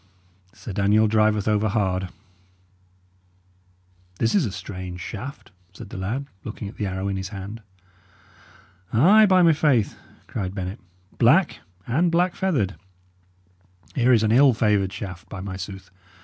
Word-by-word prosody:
Sir 105 - -9
Daniel 105 +2 +3
driveth 110 -1 +2
over 105 0 +2
hard." 95 -3 -1 2.1
"This 115 - +1
is 180 - +3
a - - -5
strange 90 -2 -7
shaft," 120 - -8 0.2
said 115 - -10
the - - -7
lad, 115 +9 -3 0.2
looking 105 -1 -6
at 100 - -10
the 105 - -2
arrow 95 +1 -3
in 100 -1 -2
his 95 0 -5
hand. 100 +3 -8 1.3
"Ay, 200 - +6
by 185 -2 +5
my 165 -1 +6
faith!" 140 -8 +2 0.3
cried 95 -3 -5
Bennet. 95 +2 -5 0.4
"Black, - - +4 0.3
and 165 +8 +1
black 175 +2 +2
feathered. 140 - 0 1.2
Here 125 -1 +3
is 115 -3 +4
an 110 - +2
ill 130 +1 +5
favoured 105 -4 +1
shaft, 95 -3 -8
by 95 - -7
my 95 0 -6
sooth! 95 0 -8
105 Hz, 145 wpm, -23 LUFS, 95-125 Hz, 2.1 s, Ay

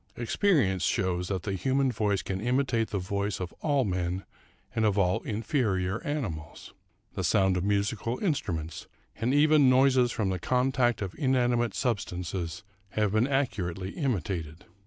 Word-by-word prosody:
Ex 120 -1 -3
perience 135 - +3
shows 90 -2 0
that 95 -2 -2
the 100 - -2
human 130 +7 +1
voice 105 -4 0
can 95 0 -3
imitate 125 -1 +1
the 100 - -2
voice 100 +2 -2
of 90 -1 -5
all 145 -5 +2
men 90 -1 -2 0.5
and 110 - +1
of 105 -2 +2
all 90 -2 +2
inferior 105 -3 -1
^mimals. 85 - -5 0.4
The - - -3
sound 95 -1 +3
of 90 - -1
musical 105 +4 0
instruments, 85 - -2 0.3
and 115 +3 0
even 145 -1 +5
noises 130 -1 +4
from 105 -4 -1
the 95 -1 -2
contact 125 0 +1
of 95 - -5
inanimate 120 -4 +1
substances, 90 - -3 0.3
have 105 -2 +1
been 110 +4 +2
accurately 100 -9 -1
imitated. 90 - -3
105 Hz, 150 wpm, -28 LUFS, 95-130 Hz, 0.5 s, even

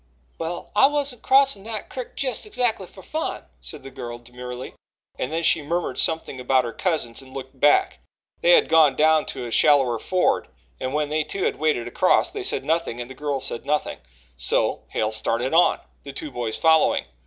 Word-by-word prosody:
"Well, 165 +1 -5
I 210 - +7
wasn't 280 -4 -1
crossin' 270 -5 +4
that 220 -2 -5
crick 255 -2 -7
jes' 260 - -2
exactly 240 - -1
fer 190 - -15
fun," 315 +1 -4 0.2
said - - -8
the 135 - -9
girl 120 -2 -7
demurely, 125 +1 -9 0.5
and 130 - -2
then 165 +1 -1
she 160 - +4
murmured 170 +4 -2
something 160 -5 -1
about 125 0 +2
her 115 - -5
cousins 150 -10 -1
and 130 0 -15
looked 130 0 -8
back. 145 +2 +3 0.4
They - - +5
had 480 -3 +5
gone 155 -4 +5
down 155 +1 +3
to - - -5
a 120 - -6
shallower 135 -4 +4
ford, 185 +9 0 0.3
and 130 +2 -3
when 150 -1 0
they, 155 +1 0
too, 190 +5 -4
had - - 0
waded 150 -6 0
across, 120 - +2
they - - -5
said - - -1
nothing 160 -7 -1
and 120 +1 -6
the - - -7
girl 145 0 -3
said 120 -3 -2
nothing 150 +2 -1 0.4
so - - 0
Hale 110 0 -1
started 115 +5 -1
on, 170 +2 +4 0.2
the 140 - -9
two 150 +2 -6
boys 120 -3 -3
following. 160 -1 +3
150 Hz, 195 wpm, -23 LUFS, 125-175 Hz, 0.5 s, I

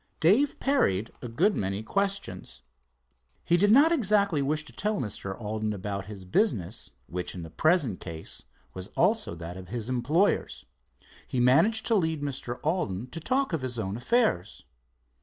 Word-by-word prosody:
Dave 220 - +3
parried 115 - +1
a 125 - -5
good 180 - +2
many 100 +2 -2
questions. 195 - -3 0.8
He 170 - +4
did 200 +4 +4
not 290 +8 +7
exactly 205 - +3
wish 150 +2 -1
to - - -12
tell 210 +1 -1
Mr. 100 -3 -4
Alden 110 -1 -2
about 100 -1 -4
his 100 -3 -8
business, 95 - 0
which 90 +1 -5
in 90 - -6
the 80 - -9
present 150 - +2
case 80 -2 -6 0.3
was 95 0 -6
also 210 - +2
that 85 +2 -7
of 95 -1 -9
his 115 +3 -4
employers. 145 +11 +1 0.6
He 130 - -2
managed 165 - +4
to 230 - +2
lead 160 -7 +1
Mr. 130 -3 -4
Alden 130 - -1
to - - -5
talk 260 - 0
of 160 - 0
his 125 -2 -3
own 100 -3 -2
affairs. 120 - 0
130 Hz, 160 wpm, -28 LUFS, -, 0.8 s, not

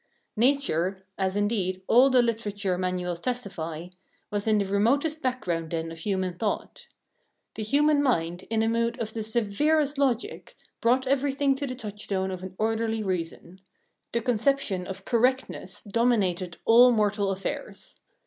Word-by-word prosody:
Nature 200 - +1
as, 190 0 -1
indeed, 200 -3 0
all 255 +6 +6
the 255 -2 +5
literature 205 -5 -1
manuals 180 -1 -2
testify 175 -9 -4 0.5
was 205 +1 -2
in 215 -1 +4
the 200 - +1
remotest 275 +11 +1
background 175 -11 -2
then 165 0 -3
of 165 - -9
human 185 0 -1
thought. 205 +5 -4 0.7
The - - -6
human 290 +6 +3
mind, 175 -10 0
in 220 -1 +1
a - - +1
mood 230 +2 0
of 220 -1 -4
the 225 - -3
severest 270 +7 +1
logic, 255 -4 -1 0.3
brought 250 +3 +3
everything 275 +1 +2
to 275 +1 -4
the 255 - -4
touchstone 205 -4 -3
of 185 -1 -5
an 185 0 -8
orderly 225 0 0
reason; 180 -1 -4 0.5
the 235 - 0
conception 230 -5 0
of 190 - -7
"correctness" 245 -6 0
dominated 200 -6 0
all 245 +2 +7
mortal 210 -3 +1
affairs. 195 0 -5
215 Hz, 145 wpm, -26 LUFS, 185-250 Hz, 0.7 s, all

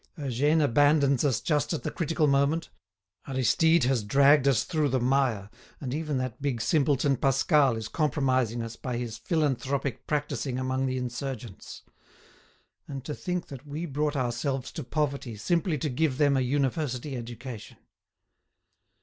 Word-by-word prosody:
Eugène 145 +3 +1
abandons 140 0 +3
us 135 -6 +2
just 150 0 0
at 160 - -3
the - - -2
critical 165 -1 0
moment; 140 +3 +2 0.6
Aristide 160 +5 +3
has 125 -3 +1
dragged 140 +5 +5
us 135 -5 +3
through 155 -4 0
the 130 0 +1
mire, 125 -6 +1 0.3
and 130 -3 -4
even 150 -2 -2
that 130 -1 -4
big 135 -4 -1
simpleton 140 +1 +2
Pascal 135 0 +3
is 110 -1 -5
compromising 130 -7 0
us 115 0 -7
by 125 -2 -4
his 120 -2 -5
philanthropic 140 -5 -1
practising 140 -4 -2
among 130 +1 -1
the 130 0 -1
insurgents. 125 -3 -6 1.0
And 135 -2 -7
to 150 - -3
think 180 +2 -3
that 135 +1 -10
we 150 +4 -4
brought 150 0 -1
ourselves 130 +1 -2
to 155 - -6
poverty 140 -4 -2
simply 165 - 0
to 150 - -2
give 140 0 0
them 145 -1 +3
a 135 - +2
university 135 0 -1
education!" 120 -1 -8
135 Hz, 150 wpm, -27 LUFS, 125-150 Hz, 1.0 s, dragged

